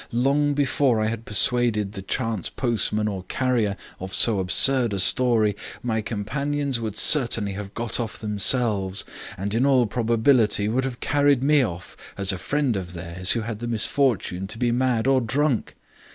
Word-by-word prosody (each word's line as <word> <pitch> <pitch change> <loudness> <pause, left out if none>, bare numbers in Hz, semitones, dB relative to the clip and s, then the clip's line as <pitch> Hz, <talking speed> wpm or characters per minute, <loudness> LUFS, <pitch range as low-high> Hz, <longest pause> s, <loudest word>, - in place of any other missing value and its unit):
Long 140 +4 +1
before 135 -4 +2
I 110 0 +1
had 115 0 -5
persuaded 105 -1 +2
the 95 - -7
chance 110 0 -2
postman 110 -3 0
or 100 -3 -3
carrier 115 -4 0 0.2
of 95 +1 -6
so 110 -4 +3
absurd 115 +4 +2
a - - -2
story, 110 +1 +3 0.3
my 110 -2 -1
companions 135 +6 -2
would 110 -2 -5
certainly 115 -6 +1
have 100 0 -7
got 115 0 -2
off 115 -2 -4
themselves, 105 -2 0 0.3
and 100 +2 -3
in 115 +3 +2
all 135 -3 +4
probability 115 -1 +2
would 130 +5 0
have 125 -2 -6
carried 145 -2 +2
me 145 0 +4
off, 90 -8 -5 0.2
as 100 0 +1
a 95 - -5
friend 140 -2 0
of 90 -2 -5
theirs 90 +2 -2
who 115 - -1
had 110 -1 -5
the 120 - -5
misfortune 115 -5 0
to 110 - -8
be 120 0 +1
mad 125 -2 +1
or 135 -1 +3
drunk. 135 +2 -1
115 Hz, 170 wpm, -24 LUFS, 105-130 Hz, 0.3 s, all